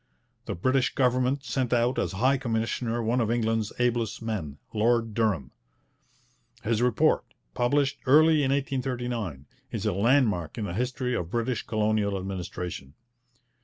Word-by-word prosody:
The -, -, -2 dB
British 130 Hz, +8 st, +1 dB
government 130 Hz, +1 st, +2 dB
sent 130 Hz, -3 st, -1 dB
out 120 Hz, +1 st, +2 dB
as -, -, -1 dB
High 130 Hz, +8 st, +2 dB
Commissioner 115 Hz, 0 st, -1 dB
one 120 Hz, +3 st, +1 dB
of 110 Hz, -, 0 dB
England's 115 Hz, -2 st, 0 dB
ablest 120 Hz, -3 st, 0 dB
men, 100 Hz, -11 st, -4 dB, 0.2 s
Lord 115 Hz, +1 st, +2 dB
Durham. 105 Hz, -, 0 dB, 1.1 s
His 115 Hz, 0 st, +1 dB
report, 125 Hz, -2 st, +3 dB, 0.3 s
published 140 Hz, +2 st, +1 dB
early 155 Hz, +3 st, +6 dB
in 135 Hz, -, +1 dB
1839, 125 Hz, -, -2 dB, 0.3 s
is -, -, -3 dB
a -, -, +1 dB
landmark 105 Hz, -, +2 dB
in 110 Hz, -, -2 dB
the 90 Hz, -, -4 dB
history 125 Hz, +3 st, -1 dB
of 85 Hz, -8 st, -2 dB
British 120 Hz, +3 st, -1 dB
colonial 105 Hz, -2 st, 0 dB
administration. 90 Hz, -6 st, -5 dB
115 Hz, 135 wpm, -27 LUFS, 105-125 Hz, 1.1 s, early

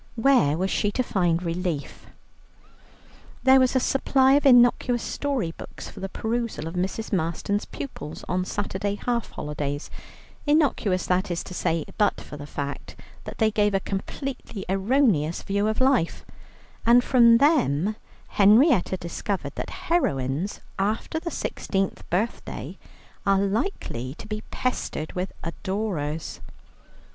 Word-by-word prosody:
Where 225 Hz, -, +4 dB
was 190 Hz, +2 st, -1 dB
she 205 Hz, -, +1 dB
to 255 Hz, -, +1 dB
find 175 Hz, -6 st, +1 dB
relief? 170 Hz, -3 st, -3 dB, 1.4 s
There 265 Hz, 0 st, +7 dB
was 255 Hz, 0 st, +3 dB
a -, -, +5 dB
supply 265 Hz, 0 st, +3 dB
of 285 Hz, 0 st, +4 dB
innocuous 245 Hz, -1 st, +5 dB
story 270 Hz, -12 st, -2 dB
books -, -, -9 dB
for -, -, -11 dB
the 195 Hz, -, -4 dB
perusal 225 Hz, -7 st, -2 dB
of 165 Hz, -, -6 dB
Mrs. 190 Hz, +5 st, -3 dB
Marston's 180 Hz, +4 st, -1 dB
pupils 210 Hz, -, -7 dB
on 180 Hz, +1 st, 0 dB
Saturday 200 Hz, +1 st, -2 dB
half 235 Hz, +1 st, -2 dB
holidays, 145 Hz, -1 st, -4 dB, 0.6 s
innocuous, 275 Hz, -, +2 dB
that 185 Hz, +2 st, +1 dB
is 175 Hz, -1 st, -2 dB
to 180 Hz, -, -9 dB
say, 165 Hz, -3 st, 0 dB
but 205 Hz, -1 st, +3 dB
for -, -, -9 dB
the 145 Hz, 0 st, -8 dB
fact 140 Hz, -1 st, -5 dB, 0.3 s
that -, -, -7 dB
they 220 Hz, -1 st, +3 dB
gave 210 Hz, -1 st, +2 dB
a -, -, +3 dB
completely 205 Hz, +2 st, -5 dB
erroneous 195 Hz, -, +2 dB
view 200 Hz, +1 st, 0 dB
of 220 Hz, -, -1 dB
life, 260 Hz, -10 st, +2 dB, 0.6 s
and 240 Hz, +1 st, +6 dB
from 235 Hz, -3 st, +6 dB
them 215 Hz, -, +3 dB, 0.3 s
Henrietta 210 Hz, -, +5 dB
discovered 180 Hz, +3 st, -4 dB
that -, -, -5 dB, 0.2 s
heroines 145 Hz, -, 0 dB, 0.2 s
after 215 Hz, +10 st, -1 dB
the 340 Hz, -, -4 dB
sixteenth 195 Hz, -, -3 dB
birthday 205 Hz, +7 st, -3 dB, 0.5 s
are 195 Hz, -1 st, +3 dB
likely 195 Hz, -, -2 dB
to -, -, -10 dB
be 215 Hz, 0 st, -4 dB
pestered 250 Hz, -10 st, -3 dB
with 180 Hz, +1 st, -3 dB
adorers. 170 Hz, -4 st, -3 dB
200 Hz, 135 wpm, -25 LUFS, 170-245 Hz, 1.4 s, There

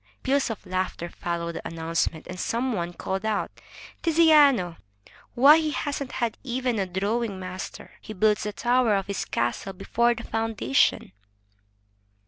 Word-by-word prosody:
Peals 275 Hz, 0 st, +1 dB
of 225 Hz, -, -6 dB
laughter 185 Hz, -2 st, -3 dB
followed 170 Hz, -1 st, -3 dB
the -, -, -6 dB
announcement, 165 Hz, 0 st, -2 dB
and 180 Hz, 0 st, -8 dB
some 245 Hz, +2 st, -1 dB
one 175 Hz, -4 st, -2 dB
called 190 Hz, +2 st, -4 dB
out, 215 Hz, -2 st, -1 dB, 0.5 s
"Tiziano! 295 Hz, -, +5 dB, 0.6 s
Why, 285 Hz, +6 st, +8 dB
he 310 Hz, -1 st, -1 dB
hasn't 285 Hz, -2 st, -3 dB
had 235 Hz, -3 st, -2 dB
even 250 Hz, -3 st, -1 dB
a 190 Hz, -, -1 dB
drawing 200 Hz, +2 st, -2 dB
master. 185 Hz, 0 st, -7 dB
He 215 Hz, -, -8 dB
builds 215 Hz, +1 st, +2 dB
the 210 Hz, -, -3 dB
tower 240 Hz, -2 st, +2 dB
of 195 Hz, -1 st, -1 dB
his 200 Hz, -1 st, -3 dB
castle 120 Hz, +11 st, -2 dB
before 235 Hz, +5 st, +1 dB
the 235 Hz, -, -7 dB
foundation." 225 Hz, -, +1 dB
215 Hz, 145 wpm, -25 LUFS, 185-250 Hz, 0.6 s, Why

